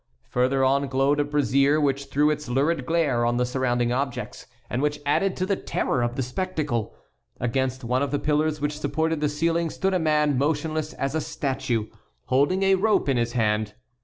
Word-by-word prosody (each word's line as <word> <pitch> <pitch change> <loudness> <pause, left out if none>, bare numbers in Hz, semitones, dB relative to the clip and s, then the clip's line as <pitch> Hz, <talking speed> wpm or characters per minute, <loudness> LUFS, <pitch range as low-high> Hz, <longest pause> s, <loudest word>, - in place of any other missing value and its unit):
Further 130 +2 +1
on 140 +1 +2
glowed 135 +2 +1
a - - +3
brazier, 145 0 +2
which 140 -1 0
threw 150 +2 +2
its 150 -3 -4
lurid 135 +2 0
glare 150 -8 +1
on 120 0 +1
the 125 - +2
surrounding 125 -1 0
objects, 135 0 -3 0.2
and 125 - -2
which 150 0 0
added 185 +7 +1
to 185 - 0
the 195 +1 +1
terror 125 - -1
of 120 0 -1
the 130 - -1
spectacle. 145 - -3 0.4
Against 130 +2 -1
one 125 +2 0
of 140 - 0
the 145 - 0
pillars 150 +1 0
which 150 +1 -2
supported 160 +2 -1
the 150 - +2
ceiling 165 +2 0
stood 190 +4 -1
a 185 - +2
man 150 -4 +2
motionless 155 +1 -1
as 135 0 -3
a 160 - 0
statue, 135 -7 -2 0.4
holding 145 +9 +2
a 195 0 +4
rope 210 0 +2
in 135 -3 +2
his 120 0 -1
hand. 105 -2 0
140 Hz, 190 wpm, -25 LUFS, 130-155 Hz, 0.4 s, a